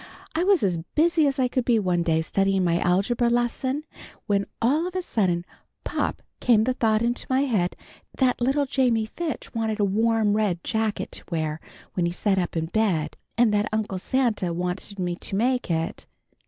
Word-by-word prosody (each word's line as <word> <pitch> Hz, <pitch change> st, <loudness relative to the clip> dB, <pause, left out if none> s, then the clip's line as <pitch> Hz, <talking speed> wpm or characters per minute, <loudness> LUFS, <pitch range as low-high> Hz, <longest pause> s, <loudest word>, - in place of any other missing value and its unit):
"I 325 Hz, +2 st, +1 dB
was 385 Hz, -, +3 dB
as 180 Hz, -4 st, +1 dB, 0.2 s
busy 320 Hz, -1 st, +4 dB
as 275 Hz, 0 st, 0 dB
I 260 Hz, -1 st, +2 dB
could 250 Hz, 0 st, -1 dB
be 235 Hz, -1 st, +3 dB
one 180 Hz, -4 st, +1 dB
day, 160 Hz, -2 st, +2 dB
studying 195 Hz, +3 st, +1 dB
my 170 Hz, -1 st, +2 dB
Algebra 200 Hz, +7 st, +2 dB
lesson, 240 Hz, +4 st, 0 dB, 0.4 s
when 200 Hz, -1 st, +1 dB
all 295 Hz, +9 st, +2 dB
of 365 Hz, -, -8 dB
a 370 Hz, -, 0 dB
sudden, 180 Hz, -, 0 dB, 0.4 s
pop -, -, -2 dB, 0.2 s
came 225 Hz, -3 st, +4 dB
the 255 Hz, +3 st, +1 dB
thought 220 Hz, -3 st, +2 dB
into 240 Hz, +1 st, -1 dB
my 260 Hz, +1 st, +3 dB
head 210 Hz, -10 st, 0 dB, 0.4 s
that 255 Hz, -2 st, +2 dB
little 275 Hz, +4 st, +2 dB
Jamie 250 Hz, -5 st, +1 dB
Fitch 310 Hz, +4 st, -5 dB
wanted 220 Hz, -1 st, -1 dB
a 205 Hz, -, +3 dB
warm 220 Hz, +1 st, +2 dB
red 200 Hz, -6 st, 0 dB
jacket 220 Hz, -1 st, -1 dB
to -, -, -4 dB
wear 155 Hz, -2 st, -2 dB, 0.3 s
when 175 Hz, -2 st, +1 dB
he -, -, -1 dB
sat 195 Hz, +2 st, +1 dB
up 175 Hz, -2 st, -2 dB
in 160 Hz, -, 0 dB
bed, 170 Hz, -5 st, 0 dB, 0.2 s
and 235 Hz, -3 st, +4 dB
that 210 Hz, 0 st, +1 dB
Uncle 215 Hz, -3 st, -2 dB
Santa 230 Hz, -6 st, 0 dB
wanted 180 Hz, +4 st, -3 dB
me 180 Hz, -2 st, -1 dB
to 195 Hz, -, -4 dB
make 250 Hz, +3 st, +1 dB
it. 165 Hz, -1 st, -2 dB
220 Hz, 190 wpm, -25 LUFS, 180-250 Hz, 0.4 s, busy